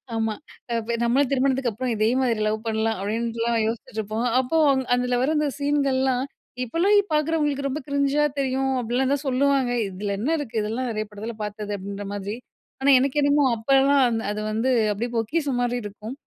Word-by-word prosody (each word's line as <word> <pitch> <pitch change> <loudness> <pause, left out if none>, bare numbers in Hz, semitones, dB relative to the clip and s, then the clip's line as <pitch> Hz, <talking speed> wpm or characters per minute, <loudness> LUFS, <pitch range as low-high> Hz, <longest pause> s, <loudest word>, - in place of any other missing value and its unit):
ஆமா 225 -1 0 0.7
நம்மளும் 250 +3 +2
திருமணத்துக்கு 265 -1 +1
அப்புறம் 245 +4 -3
இதே 215 0 +2
மாதிரி 235 -4 +1
லவ் 215 +1 0
பண்ணலாம் 220 0 0
அப்டிட்லாம் 230 +2 -1
யோசிச்சிட்டுருப்போம். 220 -1 -3
அப்போ 260 +5 0
அந்த 265 -1 0
அதுல 250 0 0
வர்ற 280 +5 +1
அந்த 300 - +1
சீன்கள்லாம் 270 -3 +1 0.4
இப்போலாம் 340 - +2 0.2
பார்க்குறவங்களுக்கு 300 -2 +1
ரொம்ப 275 +2 -3
கிரிஞ்சா 280 +1 +1 0.2
தெரியும், 265 0 0
அப்டிலாம் 250 +4 0
தான் 285 0 -2
சொல்லுவாங்க. 270 -1 +2 0.2
இதுல 200 +2 -4
என்ன 240 +8 -1
இருக்கு 240 -6 -3
இதெல்லாம் 230 +4 -2
நெறைய 215 -1 -2
படத்துல 215 +2 -7
பார்த்தது 210 0 -5
அப்படின்ற 200 +1 -6
மாதிரி. 205 +1 -4 0.5
ஆனா 280 - +3
எனக்கு 275 +2 0
என்னமோ 285 0 +3
அப்பலாம் 270 +4 +4
அந் 225 -2 -1
அது 210 - -3
வந்து 225 +4 0 0.2
அப்டியே 235 +4 -3
பொக்கிசம் 265 +3 0
மாரி 245 0 0
இருக்கும். 210 +4 -7
245 Hz, 160 wpm, -24 LUFS, 220-275 Hz, 0.7 s, அப்பலாம்